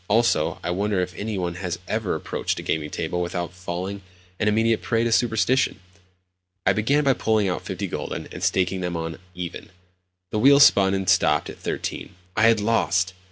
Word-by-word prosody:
Also, 115 +3 +2
I 90 - -1
wonder 100 +2 0
if 90 -1 -2
any 105 +2 -3
one 90 -2 -2
has 90 -1 -3
ever 110 -4 -1
approached 80 - -3
a - - -5
gaming 75 -1 -1
table 85 +3 -3
without 85 0 -3
falling 95 +2 -5 0.4
an 105 - +1
immediate 110 +1 +2
prey 115 -1 0
to 115 - 0
superstition? 120 +2 +2 0.9
I 95 - +4
began 135 +9 +2
by 135 -1 +4
pulling 110 -4 +1
out 90 - -2
fifty - - -4
gülden, - - -5
and - - -7
staking 95 0 +1
them 90 -1 -2
on 80 0 -5 0.2
"even." 90 -1 -6 0.6
The 105 - 0
wheel 140 +4 +7
spun 100 -8 +6
and 95 -1 -3
stopped 75 -5 +3
at - - -14
13. 95 - -4 0.2
I 110 +1 +5
had 115 -1 +4
lost! 95 -4 +1
95 Hz, 185 wpm, -24 LUFS, 90-110 Hz, 0.9 s, wheel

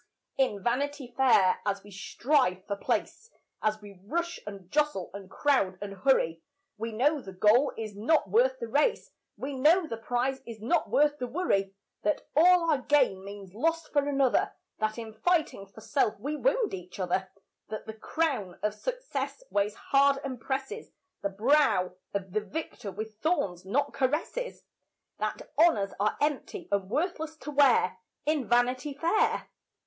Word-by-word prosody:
In 230 -8 0
Vanity 270 +1 -1
Fair, 230 -8 +4
as 200 -1 -2
we 205 - -14
strive 200 -1 0
for 200 - -2
place, 455 - -2 0.3
As 215 0 0
we 200 -3 -12
rush 345 - -2
and 195 -2 -9
jostle 295 -11 0
and 195 -1 -9
crowd 200 -11 +1
and 200 -1 -6
hurry, 185 -7 +2 0.3
We 225 +1 -4
know 285 +7 +2
the 195 - -9
goal 220 +9 +4
is 215 -2 -5
not 265 +10 +2
worth - - +3
the 470 -1 -5
race - - +1 0.3
We 280 +2 -4
know 315 +7 +4
the 230 -7 -5
prize 245 +4 -1
is 230 -2 -9
not 275 +10 +1
worth 295 0 +3
the 250 - -2
worry; 200 - 0 0.3
That 205 - 0
all 340 +1 +6
our 290 - +2
gain 255 -9 +2
means 200 -2 -9
loss 330 +8 0
for 285 -1 +1
another; 275 -3 +2 0.3
That 215 +1 -1
in 225 -2 -7
fighting 315 - 0
for 200 +3 -14
self 270 -3 0
we 290 +3 -3
wound - - +1
each 180 +1 -8
other; 185 +1 -1 0.4
That 215 0 -5
the 220 - -6
crown 220 - -2
of 210 0 +1
success - - -4
weighs 205 +1 +1
hard 275 0 +3
and 260 -4 -5
presses 270 - -4 0.3
The 200 - -1
brow 210 -3 +3 0.2
of 190 -2 -3
the 215 - +1
victor 220 -4 -6
with 215 +2 -7
thorns 195 - 0
not 255 +9 0
caresses; 315 - -2 0.6
That - - -3
honours 205 -13 +4
are 210 +1 +1
empty 295 -2 -2
and 195 -2 0
worthless 320 - -2
to 295 -1 -7
wear, 255 -10 +4 0.3
In 300 -4 0
Vanity 250 +4 +2
Fair. 340 +8 +1
250 Hz, 165 wpm, -29 LUFS, 205-300 Hz, 0.6 s, all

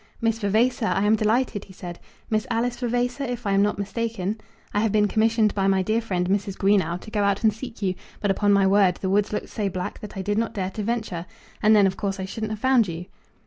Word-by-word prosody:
"Miss 225 -1 0
Vavasor, 220 +3 +2
I 195 - +1
am 210 +1 +4
delighted," 220 0 0
he 190 - -14
said. 175 -1 -8 0.3
"Miss 215 -1 0
Alice 240 +1 0
Vavasor, 245 +2 -1
if 245 -2 -4
I 200 - +1
am 195 0 +4
not 210 +1 +1
mistaken? 215 0 -3 0.3
I 205 - +2
have 220 0 +1
been 210 0 +3
commissioned 220 +1 +2
by 195 -1 +1
my 190 -1 +3
dear 220 +4 +1
friend 180 -5 -1
Mrs. 195 0 -1
Greenow 195 -3 +2
to 215 - -11
go 210 - 0
out 200 +1 +1
and 220 -1 +4
seek 225 -1 -8
you, 185 -2 +1 0.3
but, 205 - +1
upon 205 +1 +2
my 200 -1 +4
word, 190 -2 +4
the 190 0 -3
woods 205 +1 +2
looked 210 - -3
so 205 -3 -2
black 180 -1 -5
that 210 -2 -9
I 190 - -3
did 205 +2 0
not 230 0 -2
dare 190 -2 -2
to 215 - -5
venture; 210 -6 -3 0.3
and 215 0 +6
then, 205 -2 +6
of 190 0 0
course, 195 -1 -2
I 190 - -3
shouldn't 215 +2 -4
have 215 - -3
found 255 -3 +4
you." 170 +1 -5
210 Hz, 250 wpm, -24 LUFS, 195-225 Hz, 0.3 s, and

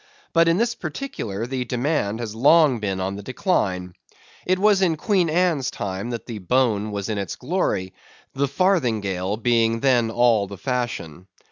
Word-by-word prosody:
But 165 0 +4
in 165 +1 +3
this 235 +2 +1
particular, 155 - -5
the 130 0 -3
demand 120 -3 -1
has 110 -3 -5
long 140 +2 +4
been 100 -3 -2
on 95 +1 -3
the - - -7
decline. 95 - -1 0.5
It 185 +1 +3
was 200 0 +3
in 175 -4 +3
Queen 185 -1 +1
Anne's 160 -5 +1
time 100 +3 -4
that 120 -2 -5
the 115 -3 -6
bone 110 0 +1
was 100 -1 -4
in 110 -2 -2
its 95 -4 -4
glory, 125 - -2 0.4
the 140 +1 0
farthingale 110 - 0
being 115 0 +1
then 125 -4 +3
all 115 -3 +3
the 100 0 -9
fashion. 120 - -4
120 Hz, 165 wpm, -23 LUFS, 100-160 Hz, 0.5 s, But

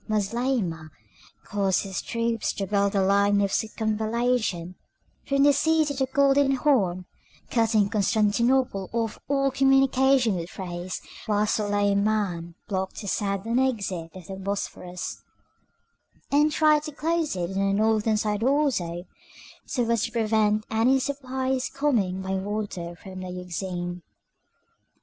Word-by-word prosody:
Moslemah 210 -6 -1 0.6
caused 195 -2 0
his 195 -2 -4
troops 230 -1 -1
to 195 - -3
build 200 0 +1
a 195 - +3
line 200 +1 +3
of 200 -1 +1
circumvallation 220 -4 -1 0.5
from 275 0 +3
the 285 0 +6
sea 315 +2 +3
to 290 - -2
the 265 -1 -1
Golden 275 +1 +3
Horn, 195 -11 +1 0.5
cutting 225 -3 +3
Constantinople 215 +1 +1
off 230 -2 0
from - - -19
all 275 -1 +1
communication 270 -2 +4
with 170 -1 -4
Thrace, 180 -2 -5 0.3
while 210 0 +2
Suleiman 205 -4 0
blocked 190 -2 -3
the 205 - -7
southern 200 +5 -1
exit 200 -10 -1
of 185 -2 -10
the 190 +2 -7
Bosphorus, 190 -2 -5 1.1
and 295 +2 +4
tried 305 0 +4
to 305 0 -6
close 320 - -1
it 175 0 -3
on 195 - -2
the 195 0 +2
northern 215 +1 +2
side 210 0 -1
also, 240 - +1 0.6
so 245 -4 -1
as 230 -3 +1
to 230 - -6
prevent 215 -2 +1
any 230 +4 +3
supplies 265 -1 -2
coming 210 -10 0
by 190 - -4
water 190 -3 -3
from 185 +1 -10
the 185 0 -6
Euxine. 180 0 -5
215 Hz, 135 wpm, -25 LUFS, 190-260 Hz, 1.1 s, the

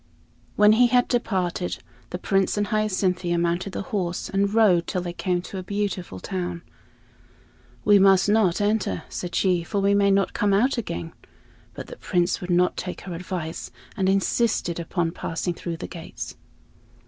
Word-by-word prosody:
When 210 0 +6
he 240 +3 +5
had 245 0 +3
departed, 185 -7 -1 0.3
the 180 - -4
Prince 195 +2 +1
and 205 - +1
Hyacinthia 185 -4 0
mounted 175 +3 -1
the - - -3
horse 180 -4 -2
and 200 +1 +1
rode 205 -6 +4
till 180 -2 -2
they 175 -1 -4
came 180 0 -1
to 190 - -6
a - - -6
beautiful 195 - -3
town. 175 - -4 1.2
"We 205 -1 +6
must 195 0 +5
not 205 -4 +3
enter," 205 - 0
said 175 -1 -5
she, 180 -3 +2
"for 200 - -2
we 200 +1 +3
may 200 0 +4
not 195 0 +2
come 200 -1 +2
out 250 +5 +2
again." 85 - -5 0.6
But - - -6
the - - -10
Prince 175 +2 0
would 180 - -6
not 180 +1 +2
take 180 - -5
her 180 - -7
advice, 170 -2 -5 0.3
and 190 -1 +1
insisted 195 -2 +1
upon 170 0 -1
passing 170 +1 -3
through 170 -1 -5
the - - -6
gates. 165 -2 -8
185 Hz, 170 wpm, -24 LUFS, 175-205 Hz, 1.2 s, When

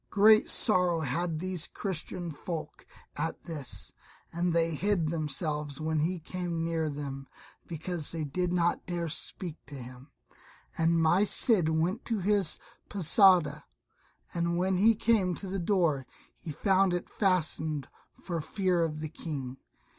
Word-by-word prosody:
Great 215 +2 +5
sorrow 180 -5 +4
had 160 +4 -1
these 180 -1 -2
Christian 175 -2 -4
folk 155 0 -7 0.3
at - - -3
this, 150 -6 -5 0.4
and 175 +1 0
they 165 0 +1
hid 175 -1 0
themselves 150 -2 -3
when 155 0 -1
he 175 +5 0
came 170 0 -4
near 165 -1 -1
them 140 -2 -6 0.4
because 165 -1 -3
they 165 -2 -3
did 175 +5 -2
not 175 -1 +1
dare 175 -1 -2
speak 165 0 -5
to 145 - -9
him; 125 +2 -10 0.7
and 165 +1 +2
my 170 +5 +4
Cid 205 -5 +3
went 170 +8 0
to 230 - -1
his 195 -3 +2 0.3
Posada, 175 -5 +4 0.7
and 170 0 0
when 185 +1 +1
he 220 +4 +5
came 205 -5 +2
to 200 - -7
the 195 +1 -3
door 170 - +1 0.3
he 160 - -8
found 190 +4 +2
it 175 - -4
fastened, 160 - 0 0.2
for 170 -4 -5
fear 180 0 0
of 155 -2 -3
the 155 - -4
King. 140 -5 -6
170 Hz, 145 wpm, -29 LUFS, 155-185 Hz, 0.7 s, Great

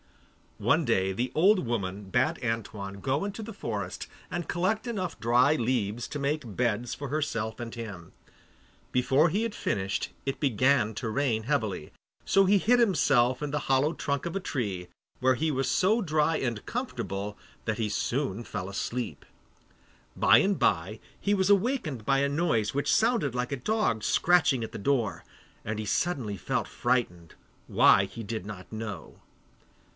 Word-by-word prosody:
One 145 +10 +2
day 95 -5 +2
the 120 +6 -2
old 185 +1 +4
woman 100 -4 -3
bade 125 +4 +1
Antoine 105 -4 -3
go 135 - 0
into 205 +2 -4
the 225 +1 -7
forest - - -4 0.2
and 175 -1 -4
collect 190 +7 0
enough 185 - -3
dry 125 +6 +4
leaves 120 -3 -1
to 145 - -4
make 140 -6 -2
beds 120 -1 0
for 140 0 -6
herself 130 -8 -2
and 115 -1 -6
him. 100 -8 -8 0.8
Before 135 +6 +3
he 200 +7 0
had 230 -2 -2
finished 100 -1 -2 0.2
it 135 -1 -2
began 130 -3 +2
to 115 - -3
rain 115 -2 0
heavily, 110 - -1 0.3
so 195 0 +4
he 200 +2 +5
hid 245 +6 +3
himself 135 - +3
in 150 - -2
the 150 0 -1
hollow 135 +4 +3
trunk 140 -3 -2
of 170 - -4
a - - +1
tree, 100 - -3 0.3
where 130 +1 +4
he 160 +6 0
was 135 -2 0
so 210 - +3
dry 155 -3 +1
and 120 -5 -3
comfortable 105 - -4 0.3
that 110 -1 -1
he 110 -2 0
soon 120 0 -1
fell 90 - -5
fast 100 - -6
asleep. 115 - -4 0.9
By - - +6
and 195 -1 +2
by 95 +5 +1 0.2
he 200 - +1
was 190 -1 +1
awakened 200 - +1
by 135 0 +3
a 140 0 +2
noise 140 -9 +1
which 140 +1 +1
sounded 225 - +2
like 125 +2 -2
a 140 - -1
dog 130 - 0
scratching 165 -8 +3
at 110 - -5
the - - -5
door, 120 -1 0 0.4
and 110 0 -3
he 110 - -3
suddenly 115 - -1
felt - - -2
frightened, 115 -10 -1 0.3
why 100 - +5
he 115 +4 -8
did 110 -2 -4
not 95 -4 -9
know. 105 -7 -7
125 Hz, 170 wpm, -28 LUFS, 110-155 Hz, 0.9 s, By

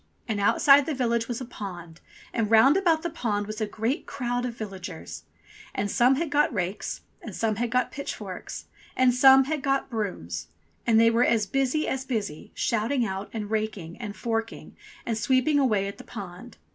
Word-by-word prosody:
And 220 -3 -1
outside 275 +7 +5
the 310 - -1
village 235 -3 0
was 240 0 -4
a - - -4
pond, 175 -8 -8 0.3
and 225 -3 0
round 230 +7 +6
about 340 -4 +2
the 340 - -1
pond 210 -9 -1
was 215 +1 -6
a 215 - 0
great 225 +6 -2
crowd 245 -2 -2
of 235 -1 -7
villagers. 185 - -7 0.5
And 200 0 -1
some 250 +3 +4
had 315 +1 -2
got 295 +1 +3
rakes, 195 -2 -3 0.2
and 215 - -8
some 220 -2 0
had 240 +1 -1
got 250 +1 +1
pitchforks, 280 - -6 0.3
and 255 -1 +5
some 265 +1 +7
had 295 +2 -2
got 275 -1 0
brooms. 180 - -4 0.4
And 225 -1 +5
they 230 0 +6
were 230 +2 +3
as 225 -3 +2
busy 270 +7 0
as 265 0 -2
busy, 215 - -4
shouting 235 +3 0
out, 195 0 -4
and 215 -2 -5
raking, 215 -6 -2
and 210 -3 -5
forking, 225 0 -4 0.3
and 225 -2 -1
sweeping 260 +5 +3
away 210 -8 +2
at 200 - -7
the - - -9
pond. 200 +2 -9
230 Hz, 185 wpm, -26 LUFS, 205-260 Hz, 0.5 s, some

